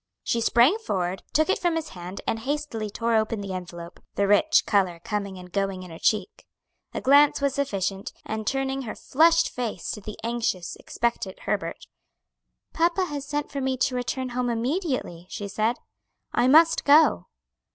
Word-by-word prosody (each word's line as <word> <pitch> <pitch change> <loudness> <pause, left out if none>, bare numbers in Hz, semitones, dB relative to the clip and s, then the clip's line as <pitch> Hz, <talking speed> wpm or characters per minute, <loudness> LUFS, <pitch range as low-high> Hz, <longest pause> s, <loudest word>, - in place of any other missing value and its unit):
She 235 - 0
sprang 245 - +4
forward, 185 - -2
took 310 +1 +3
it 380 - +1
from 345 -2 +1
his 320 -1 -3
hand 180 +2 -8
and 225 - -1
hastily 265 -4 -3
tore 230 +2 0
open 220 0 +1
the 200 -1 -5
envelope, 175 -1 -8 0.2
the 200 - +1
rich 205 +11 +4
color 185 -5 +1
coming 200 -3 -3
and 180 0 -11
going 195 -1 -2
in 180 - -10
her 165 - -9
cheek. 220 - -1 0.4
A - - -4
glance 285 +2 +5
was 280 -1 +1
sufficient, 200 -9 -2
and 220 -1 -4
turning 270 0 -1
her 225 -5 -6
flushed 330 +3 +3
face 230 -7 -4
to 210 - -6
the 210 +1 -8
anxious, 225 -7 -2
expectant 230 -5 -3
Herbert: - - -3 0.9
"Papa 345 +3 +2
has 290 -4 -5
sent 295 0 -3
for 280 - -3
me 260 0 0
to 250 +1 0
return 255 +1 -2
home 245 0 -1
immediately," 240 - -2
she 205 - -5
said; 220 +4 0 0.6
"I 245 - +3
must 325 +4 +6
go." 300 +2 +5
235 Hz, 170 wpm, -25 LUFS, 200-285 Hz, 0.9 s, must